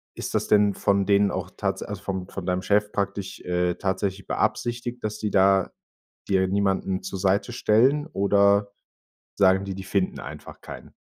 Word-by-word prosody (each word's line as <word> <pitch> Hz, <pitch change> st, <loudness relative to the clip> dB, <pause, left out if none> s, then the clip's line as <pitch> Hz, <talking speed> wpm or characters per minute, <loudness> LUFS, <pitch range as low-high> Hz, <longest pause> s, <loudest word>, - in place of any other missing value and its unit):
ist -, -, -5 dB
das -, -, 0 dB
denn 105 Hz, -1 st, +4 dB
von 100 Hz, -1 st, +1 dB
denen 100 Hz, 0 st, +3 dB
auch -, -, -4 dB
tats -, -, -3 dB
also -, -, -7 dB
von 95 Hz, -2 st, -4 dB
von 95 Hz, -3 st, -7 dB
deinem 90 Hz, 0 st, 0 dB
Chef 105 Hz, 0 st, +1 dB
praktisch, 100 Hz, -1 st, -3 dB
äh, 90 Hz, 0 st, 0 dB
tatsächlich 95 Hz, +1 st, -3 dB
beabsichtigt, 120 Hz, 0 st, -2 dB
dass 105 Hz, 0 st, -3 dB
die 105 Hz, -2 st, -2 dB
da 95 Hz, 0 st, +3 dB, 0.6 s
dir 95 Hz, -1 st, +2 dB
niemanden 95 Hz, -1 st, 0 dB
zur 95 Hz, +1 st, -5 dB
Seite 100 Hz, +5 st, +1 dB
stellen 130 Hz, +7 st, +3 dB
oder 100 Hz, 0 st, +3 dB, 0.7 s
sagen 95 Hz, -1 st, +4 dB
die, 100 Hz, -1 st, -5 dB
die 95 Hz, -, -7 dB
finden 95 Hz, -1 st, -1 dB
einfach -, -, -10 dB
keinen? -, -, -11 dB
100 Hz, 170 wpm, -25 LUFS, 95-105 Hz, 0.7 s, denn